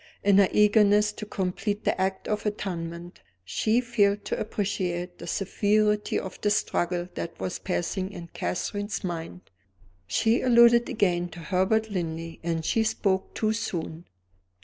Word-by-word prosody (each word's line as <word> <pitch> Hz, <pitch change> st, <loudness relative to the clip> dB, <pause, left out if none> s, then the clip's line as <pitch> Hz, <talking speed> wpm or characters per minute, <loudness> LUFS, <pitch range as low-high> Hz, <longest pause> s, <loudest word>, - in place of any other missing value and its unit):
In 200 Hz, -1 st, +5 dB
her 195 Hz, -, +5 dB
eagerness 210 Hz, 0 st, +4 dB
to 210 Hz, 0 st, -8 dB
complete 205 Hz, +2 st, -2 dB
the -, -, 0 dB
act 190 Hz, 0 st, -1 dB
of 210 Hz, 0 st, -1 dB
atonement, 175 Hz, -4 st, -5 dB, 0.2 s
she 220 Hz, -, +1 dB
failed 205 Hz, -4 st, +1 dB
to -, -, -2 dB
appreciate 180 Hz, -4 st, -2 dB
the 170 Hz, -, -8 dB
severity 210 Hz, +3 st, +1 dB
of 190 Hz, -, -8 dB
the 205 Hz, -, +2 dB
struggle 175 Hz, -4 st, 0 dB
that 170 Hz, -, -6 dB
was 180 Hz, -, -3 dB
passing 185 Hz, +1 st, -2 dB
in 170 Hz, -3 st, -9 dB
Catherine's 205 Hz, +3 st, -3 dB
mind. 175 Hz, 0 st, -5 dB, 0.7 s
She 230 Hz, +2 st, +2 dB
alluded 235 Hz, -1 st, +6 dB
again 175 Hz, -4 st, +1 dB
to 175 Hz, -, -10 dB
Herbert 190 Hz, +6 st, +1 dB
Linley, 165 Hz, -3 st, -4 dB
and 165 Hz, -1 st, -2 dB
she 225 Hz, -, +2 dB
spoke 195 Hz, -3 st, -1 dB
too 215 Hz, 0 st, +1 dB
soon. 170 Hz, -6 st, -4 dB
195 Hz, 145 wpm, -26 LUFS, 175-210 Hz, 0.7 s, alluded